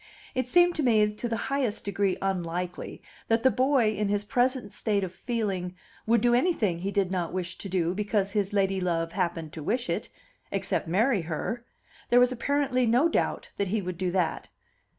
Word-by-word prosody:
It 255 -2 -1
seemed 350 +6 +5
to - - +1
me 215 -5 +3
to 235 +3 -4
the 230 - -1
highest 260 -6 -1
degree 200 -1 0
unlikely 180 -1 -3 0.2
that 225 0 +2
the 260 - +5
boy 260 -4 +3
in 210 -1 -1
his 205 0 0
present 250 -2 0
state 205 -2 0
of 185 -1 -4
feeling 195 -5 -3 0.3
would 230 -1 +4
do 240 +1 +3
anything 240 - +2
he 190 +3 -2
did 200 -2 0
not 175 -3 -1
wish 180 -1 -3
to 195 - -6
do 175 -2 0
because 205 0 0
his 200 -2 0
ladylove 185 -4 0
happened 165 -4 -2
to 160 - -7
wish 240 - -1
it - - -2 0.4
except - - -1
marry 210 +5 +2
her! 170 +9 -3 0.5
There 245 - +6
was 250 0 +5
apparently 255 -1 +1
no 250 +9 +4
doubt - - -1
that 200 - 0
he 215 +4 0
would 180 -2 -5
do 185 -1 0
that. 175 -3 -1
205 Hz, 190 wpm, -27 LUFS, 180-245 Hz, 0.5 s, There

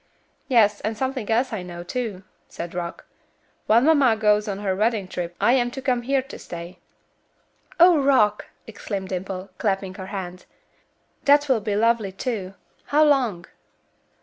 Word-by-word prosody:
"Yes, 215 -5 +3
and 215 +1 -3
something 260 -3 -3
else 235 +2 +1
I 210 - -3
know, 175 -1 -8
too," 205 -1 -4 0.2
said 170 0 -7
Rock. 175 -1 -5 0.6
"While 225 +2 +5
mamma 280 -5 +4
goes 210 -1 +2
on 200 -2 -3
her 195 -2 -1
wedding 215 -1 0
trip 175 -1 -5
I 230 +5 +4
am 245 -2 +2
to 255 - -7
come 255 -2 0
here 265 +2 0
to 270 - -11
stay." 170 +1 -9 1.0
"Oh! 345 -3 +7
Rock," 220 -7 +3 0.2
exclaimed 200 -3 -6
Dimple, 190 +1 -5
clapping 195 -2 -1
her 190 -1 -8
hands, 185 -2 -7 0.8
"that 290 +1 +5
will 255 -5 +2
be 205 0 -2
lovely, 225 -2 +2
too. 195 -2 -4 0.3
How 300 +2 +3
long?" 245 - +1
210 Hz, 155 wpm, -23 LUFS, 190-250 Hz, 1.0 s, Oh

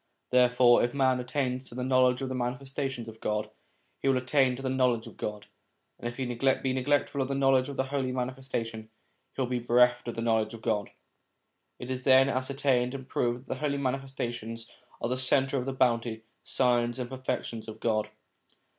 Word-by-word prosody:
Therefore 125 -1 +5
if 120 +3 -1
man 130 -2 +3
attains 130 0 -2
to 120 - -11
the 125 - -3
knowledge 130 0 +3
of 130 - -2
the - - -3
Manifestations 130 0 -3
of 110 0 -10
God, 105 0 -2 0.5
he - - -2
will 135 -1 +4
attain 130 0 +2
to 135 - -8
the - - -1
knowledge 125 -3 +1
of - - -11
God; 105 -1 -5 0.5
and - - -4
if 120 - -6
he 130 - -2
be 130 +2 +1
neglectful 140 +1 +1
of 130 - 0
the 140 - -2
knowledge 135 -1 +3
of 140 - -7
the 130 - +2
Holy 135 -1 -2
Manifestation, 125 -3 -4 0.5
he - - -2
will - - -1
be 125 0 -1
bereft 120 +1 +3
of 120 - -3
the 115 - -3
knowledge 110 -1 +1
of 110 - -13
God. 105 -3 0 0.9
It 125 +1 -6
is 130 0 -3
then 130 +1 +6
ascertained 130 -1 0
and 135 -1 -7
proved 120 -1 -1
that 135 - -23
the - - -3
Holy 145 -2 0
Manifestations 120 -4 -4 0.3
are - - 0
the 130 +1 0
centre 135 +1 +2
of 125 - -4
the - - 0
bounty, 115 -3 +1 0.2
signs, 120 -2 +1
and 125 -2 -3
perfections 125 -3 -4
of 110 - -8
God. 110 -2 0
125 Hz, 200 wpm, -29 LUFS, 120-135 Hz, 0.9 s, then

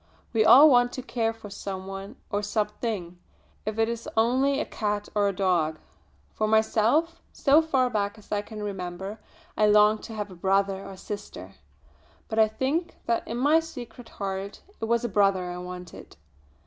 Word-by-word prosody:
We 220 -2 +4
all 280 +7 +9
want 245 -3 +5
to 255 - -5
care 230 -2 -1
for 225 -3 -11
some 190 -1 -6
one 195 0 -7 0.2
or 205 - 0
something, 210 -4 -3 0.5
if 215 0 -2
it 225 0 +3
is 235 0 -4
only 260 +5 +3
a - - -1
cat 210 -1 -3
or 205 -1 +2
a - - +2
dog. 175 -5 +1 0.6
For 215 - 0
myself, 225 +10 +2
so 290 +3 +4
far 270 -6 +1
back 210 -2 -2
as 215 - -18
I 205 -1 +1
can 210 0 -8
remember, 190 +1 -5 0.4
I 215 - +3
longed 210 +1 +5
to 225 - -8
have 210 -2 -4
a - - -10
brother 195 +2 +1
or 195 -1 -9
sister, 185 - -8 0.8
but 220 - -1
I 220 - +6
think 275 +10 -2
that 235 - 0
in 230 - -4
my 290 +6 +4
secret 250 -7 -9
heart 195 0 -5 0.2
it - - -2
was 235 +1 +1
a - - +1
brother 195 -3 +2
I 180 - -6
wanted. 180 -1 -9
210 Hz, 180 wpm, -26 LUFS, 195-235 Hz, 0.8 s, all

